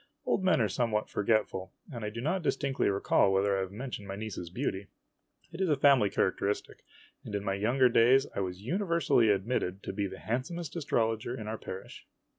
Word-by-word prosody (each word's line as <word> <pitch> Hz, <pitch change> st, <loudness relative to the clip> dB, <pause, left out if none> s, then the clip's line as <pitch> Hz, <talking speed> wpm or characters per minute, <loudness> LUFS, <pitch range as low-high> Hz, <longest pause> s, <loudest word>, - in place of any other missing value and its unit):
Old 190 Hz, -, +1 dB
men 185 Hz, -7 st, +4 dB
are 110 Hz, -, +3 dB
somewhat 110 Hz, +1 st, -1 dB
forgetful, 105 Hz, -3 st, 0 dB, 0.2 s
and 115 Hz, -3 st, -6 dB
I 105 Hz, -, -2 dB
do 115 Hz, +2 st, -6 dB
not 170 Hz, +8 st, 0 dB
distinctly 140 Hz, -3 st, 0 dB
recall 100 Hz, 0 st, +3 dB
whether 100 Hz, +1 st, +2 dB
I -, -, 0 dB
have 95 Hz, -1 st, -4 dB
mentioned 110 Hz, -2 st, -6 dB
my 95 Hz, -, -5 dB
niece's 100 Hz, -5 st, -6 dB
beauty. 95 Hz, +2 st, -3 dB, 0.6 s
It 170 Hz, +3 st, -6 dB
is 190 Hz, -, +2 dB
a 150 Hz, -, +4 dB
family 135 Hz, -6 st, +5 dB
characteristic, 100 Hz, +2 st, -1 dB, 0.4 s
and 105 Hz, -, -5 dB
in 100 Hz, -, -2 dB
my 100 Hz, -1 st, -1 dB
young 110 Hz, +6 st, 0 dB
days 130 Hz, +4 st, +5 dB
I -, -, -1 dB
was 90 Hz, -1 st, -3 dB
universally 170 Hz, -, +2 dB
admitted 100 Hz, -2 st, 0 dB
to -, -, -5 dB
be 100 Hz, 0 st, -1 dB
the -, -, -9 dB
handsomest 145 Hz, +8 st, -4 dB
astrologer 115 Hz, -6 st, -1 dB
in 110 Hz, -, -6 dB
our 110 Hz, 0 st, -4 dB
parish. 95 Hz, -, -9 dB
110 Hz, 195 wpm, -30 LUFS, 100-135 Hz, 0.6 s, family